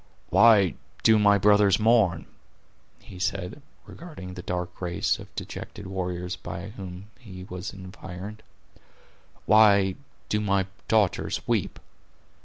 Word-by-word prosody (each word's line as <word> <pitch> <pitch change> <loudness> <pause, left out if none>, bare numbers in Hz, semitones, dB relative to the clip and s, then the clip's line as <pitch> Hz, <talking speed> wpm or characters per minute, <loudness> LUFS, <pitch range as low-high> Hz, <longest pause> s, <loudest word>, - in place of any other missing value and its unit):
"Why 105 -7 +6 0.3
do 110 -1 +6
my 100 -1 +5
brothers 105 0 +4
mourn?" 110 -5 +3 0.8
he 90 - -12
said, 95 +6 -3 0.2
regarding 150 - -10
the 90 - -7
dark 90 0 -5
race 85 -1 -1
of - - -10
dejected 100 - -7
warriors 90 -1 -4
by 90 +1 -7
whom 95 0 -9
he 95 -6 -10
was 90 0 -6
environed; 95 +2 -9 1.0
"why 100 -3 +5 0.3
do 105 - 0
my 100 -2 +1 0.2
daughters 110 -5 +1
weep? - - -1
95 Hz, 115 wpm, -26 LUFS, 90-105 Hz, 1.0 s, Why